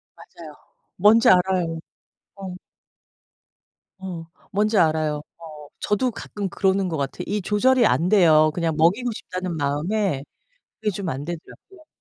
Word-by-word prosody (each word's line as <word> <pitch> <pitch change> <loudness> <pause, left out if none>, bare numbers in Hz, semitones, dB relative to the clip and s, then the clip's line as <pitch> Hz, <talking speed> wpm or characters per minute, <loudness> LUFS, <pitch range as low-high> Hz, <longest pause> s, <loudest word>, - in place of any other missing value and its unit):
맞아요. 155 -3 -13 0.4
뭔지 215 +4 +5
알아요. 180 -3 +2 0.6
어. 190 -2 -7 1.5
어. 180 -4 -7 0.3
뭔지 210 +2 +1
알아요. 155 -3 +1 0.3
어. 150 -1 -12
저도 225 +5 0
가끔 205 -2 -6
그러는 190 0 +1
것 160 - -3
같아요. 140 -2 -4
이 205 +1 -1
조절이 240 +6 +3
안돼요. 165 -5 +4
그냥 165 -2 -1
먹이고 200 +10 +2
싶다는 185 -4 -5
마음에 150 +2 -1 0.6
그게 215 -1 0
좀 195 -1 -5
안 140 -2 -4
되더라고요. 305 - -10
185 Hz, 270 characters per minute, -23 LUFS, 160-210 Hz, 1.5 s, 뭔지